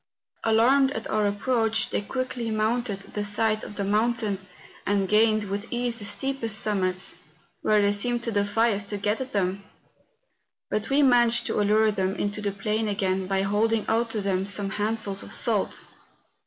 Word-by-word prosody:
Alarmed 250 +5 +4
at 225 - -4
our 215 -1 +2
approach, 225 +2 0
they - - 0
quickly 250 +1 -3
mounted 220 -1 -1
the 210 - -2
sides 215 +1 +1
of 210 - -8
the 200 - -1
mountain, 215 0 0 0.4
and 200 -1 +1
gained 215 +1 +3
with 200 +2 -4
ease 240 -1 -2
the 205 - -6
steepest 250 -2 -1
sum¬ 210 -2 +1
mits, 185 0 -1 0.4
where 210 -1 +3
they 200 - +3
seemed 240 +4 +1
to 230 - -1
defy 210 +2 +2
us 200 +1 -2
to 205 0 -4
get 210 +4 -1
at 260 0 -5
them. 195 0 -1 1.1
But 215 +1 -1
we 280 +2 +4
managed 240 -2 +4
to - - 0
allure 215 +1 +3
them 190 -1 -1
into 205 +1 -2
the 205 -1 -1
plain 215 +2 -1
again 190 -2 -1
by 195 0 0
holding 215 +2 +1
out 230 +1 +1
to 220 -2 -2
them 195 -1 -1
some 200 -1 -3
handfuls 210 -1 -2
of - - -10
salt. - - 0
215 Hz, 180 wpm, -26 LUFS, 200-230 Hz, 1.1 s, Alarmed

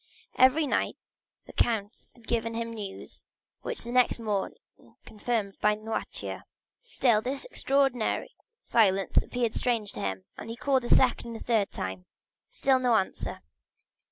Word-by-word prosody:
Every 260 +5 +5
night - - 0 0.5
the - - -12
count 220 -2 0
had 235 - -19
given 230 -1 0
him 230 0 -3
news, 205 -3 -6 0.4
which 480 - -4
was - - -5
the 235 - -6
next 250 -1 +3
morning 210 -4 -2 0.5
confirmed 215 -2 -2
by 210 0 +4
Noirtier. 220 +1 -4 0.4
Still 245 - +2
this 265 - -3
extraordinary 270 - +1 0.3
silence 195 -4 +3
appeared 240 -2 +2
strange 230 -5 0
to - - -8
him, 95 -1 -3
and - - -7
he 230 - -4
called 260 0 +1
a - - -4
second 240 -2 +3
and - - -8
third 220 -4 +2
time; 95 -1 -5 0.4
still 265 -1 +2
no 250 -2 +3
answer. 195 -3 -1
230 Hz, 150 wpm, -28 LUFS, 210-250 Hz, 0.5 s, Every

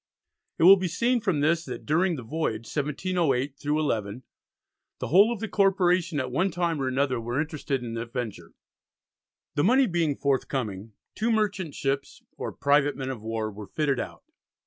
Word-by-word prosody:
It - - +1
will 195 +3 +10
be 185 -1 -1
seen 235 +8 +1
from 185 -9 0
this 160 +2 +2
that - - -7
during 170 +4 +2
the 130 - -7
voyage 115 -4 -2
(1708 145 -2 -1
11) 130 -7 -1 0.7
the - - -5
whole 200 +8 +6
of 235 - -3
the 225 - -3
Corporation 185 -5 +2
at 130 -1 -3
one 185 +9 +1
time 170 -5 -1
or 130 - 0
another 130 -2 0
were 120 +4 -2
interested 150 -4 -2
in 115 -1 -5
the 115 +1 -4
venture. 120 -3 -6 1.0
The 145 0 +1
money 260 +7 +5
being 170 - 0
forthcoming, 120 -7 -2 0.2
two 225 +2 0
merchant 200 -7 0
ships, 140 0 -3
or - - -5
"private 145 0 +2
Men 135 -1 -3
of 120 -5 -7
War" 110 -1 -3
were 105 0 -9
fitted 140 -4 0
out. - - -6
145 Hz, 170 wpm, -26 LUFS, 130-180 Hz, 1.0 s, will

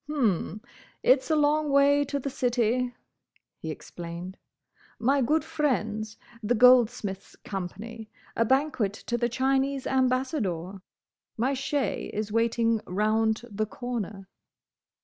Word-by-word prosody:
"H'm, 215 - 0 0.4
it 255 +2 +6
is - - -12
a 315 - +3
long 300 0 +2
way 280 +1 +5
to 285 +1 -2
the 275 0 -4
City," 245 -1 +1 0.7
he - - -6
explained, 175 +2 -7 0.6
"my 275 +4 +2
good 300 +6 +2
friends, 225 -9 -1 0.2
the 230 +3 +1
Goldsmiths' 235 -5 +4
Company—a 215 +4 -5
banquet 260 -5 +1
to 240 - -4
the 240 0 0
Chinese 270 +2 0
Ambassador—my 250 - -2
shay 275 +1 -2
is 210 0 -2
waiting 230 0 +2
round 220 +3 +1
the 215 +1 -1
corner." 215 -5 -5
240 Hz, 110 wpm, -27 LUFS, 215-270 Hz, 0.7 s, it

